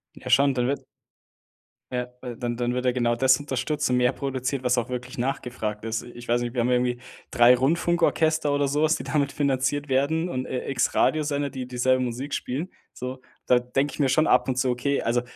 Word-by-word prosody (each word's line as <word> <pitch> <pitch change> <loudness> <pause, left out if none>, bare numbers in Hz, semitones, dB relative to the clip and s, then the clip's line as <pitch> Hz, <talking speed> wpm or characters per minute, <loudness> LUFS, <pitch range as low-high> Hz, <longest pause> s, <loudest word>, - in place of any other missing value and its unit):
Ja - - -9
schon, 140 0 +5
dann 125 -1 0
wird 140 - -2 1.1
Ja, 125 -1 -2
w 125 -2 -6
dann 120 -2 -3
dann 120 0 -1
wird 125 - -2
ja 125 - +4
genau 120 -1 +1
das 130 +1 +4
unterstützt 145 +1 -2
und 125 - +2
mehr 125 0 +3
produziert, 135 0 -3
was 125 0 +2
auch 120 0 -1
wirklich 125 0 -5
nachgefragt 120 -4 -3
ist. 115 0 -2
Ich 120 0 -11
weiß 120 +1 +2
nicht, 120 -1 -3
wir 125 - -2
haben 120 - +2
ja 125 - +2
irgendwie 125 0 0 0.3
3 120 0 +6
Rundfunkorchester 160 +1 +2
oder 145 0 +1
so 145 +2 0
was, 155 +1 +3
die - - -7
damit 140 -1 0
finanziert 140 0 0
werden 145 +6 +1
und, 130 -7 -3
äh, 125 - -4
X 130 -3 0
Radiosender, 145 -2 +1
die 130 -1 -6
dieselbe 130 +1 +1
Musik 125 +4 -4
spielen, 145 +9 -3 0.2
so. 130 +1 -6 0.2
Da 125 - +4
denke 135 +4 -1
ich - - -10
mir 140 - +3
schon 155 +4 +3
ab - - +3
und 125 - -1
zu: 130 0 +1
„Okay, 125 +3 0
also, 120 +1 +1
130 Hz, 220 wpm, -25 LUFS, 125-140 Hz, 1.1 s, 3